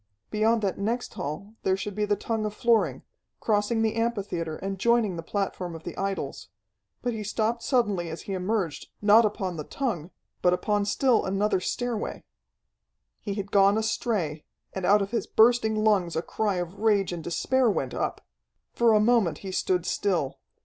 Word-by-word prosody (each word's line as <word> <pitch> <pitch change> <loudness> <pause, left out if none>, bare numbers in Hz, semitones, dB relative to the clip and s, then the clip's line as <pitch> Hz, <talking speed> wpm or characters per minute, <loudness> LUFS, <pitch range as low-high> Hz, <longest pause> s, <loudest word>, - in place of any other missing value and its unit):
Beyond 220 +1 +2
that 195 -1 -1
next 230 +5 -2
hall 175 +9 -5
there 190 0 +1
should 205 +1 -4
be 210 +1 0
the 205 0 +1
tongue 220 +2 -2
of 210 0 -3
flooring, 235 -2 +2 0.4
crossing 220 +1 +1
the 220 - +1
amphitheatre 200 -8 -2
and 195 0 -4
joining 235 -4 +2
the 165 - -4
platform 180 -1 -3
of 165 - -10
the - - -6
idols. 195 -8 -3 0.6
But 245 -1 0
he 215 -1 -4
stopped 220 +3 -1
suddenly 210 - +1
as 160 - -7
he 195 - -5
emerged, 185 -3 -2
not 215 +2 +6
upon 190 -4 -2
the 150 - -4
tongue, 195 - -3 0.3
but 180 - +4
upon 205 +2 0
still 240 +3 +2
another 195 +1 +1
stairway. 235 +4 -3 1.0
He 200 -2 -4
had 200 -1 -5
gone 200 +1 +5
astray, 215 -9 -1 0.3
and 190 -2 -2
out 205 0 +5
of 195 - -6
his 235 - -1
bursting 220 -1 +4
lungs 205 -6 +2
a 165 - -1
cry 210 -3 -1
of 180 +2 -4
rage 205 -4 +2
and 170 -2 -5
despair 255 - +1
went 135 - -1
up. - - -3 0.5
For 235 -1 +4
a 215 - +5
moment 220 -5 +3
he 190 - -4
stood 180 -2 0
still. 175 -9 -1
205 Hz, 175 wpm, -27 LUFS, 185-225 Hz, 1.0 s, not